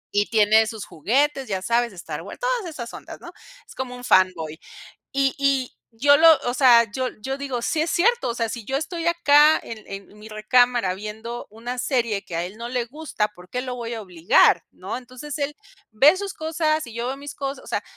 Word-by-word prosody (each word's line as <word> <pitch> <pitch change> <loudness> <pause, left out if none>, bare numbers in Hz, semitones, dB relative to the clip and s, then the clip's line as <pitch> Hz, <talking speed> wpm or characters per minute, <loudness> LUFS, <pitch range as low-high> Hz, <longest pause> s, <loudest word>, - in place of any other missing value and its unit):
y 205 0 +2
tiene 220 0 +4
sus 220 -2 -6
juguetes, 270 - 0
ya 190 -2 -3
sabes, 235 +3 +1
Star 180 -3 -7
Wars, - - -10
todas - - -1
esas 240 -7 -7
ondas, - - -10
¿no? - - -11 0.4
Es - - -13
como 255 -1 -5
un 245 - -11
fanboy. 175 -7 +2 0.5
Y 270 -1 +1
y 275 -2 +1 0.2
yo 285 +6 +4
lo, 330 +2 +7 0.2
o - - -1
sea, 235 -4 +6
yo 255 +3 -2
yo 270 +4 -3
digo: 270 -4 -4
"Sí 310 - -1
es 330 - -2
cierto, 470 - +2
o - - -1
sea, 230 -1 -2
si 235 -2 -6
yo 265 - -2
estoy 330 +3 -3
acá 310 -3 +5
en 220 -2 -9
en 195 +1 -10
mi 210 +1 -12
recámara 220 -2 +2
viendo 220 +4 -7
una 235 +3 -6
serie 235 -6 -1
que 170 - -7
a 170 - -1
él 185 +4 -8
no 235 +1 -6
le 245 -1 -1
gusta, 260 -4 -3
¿por 180 +1 -16
qué 250 - -2
lo 255 -1 -5
voy 235 -1 -5
a 225 - -5
obligar?", 175 -2 +3
¿no? 190 +5 -6
Entonces, 255 +4 -8
él 285 0 -3 0.4
ve 280 - +5
sus 400 -1 -5
cosas 315 -2 -1
y 230 - -11
yo 235 +1 -3
veo 265 +2 -3
mis 285 +1 -9
cosas, 275 0 -5
o - - -15
sea, - - -2
245 Hz, 220 wpm, -23 LUFS, 215-285 Hz, 0.5 s, lo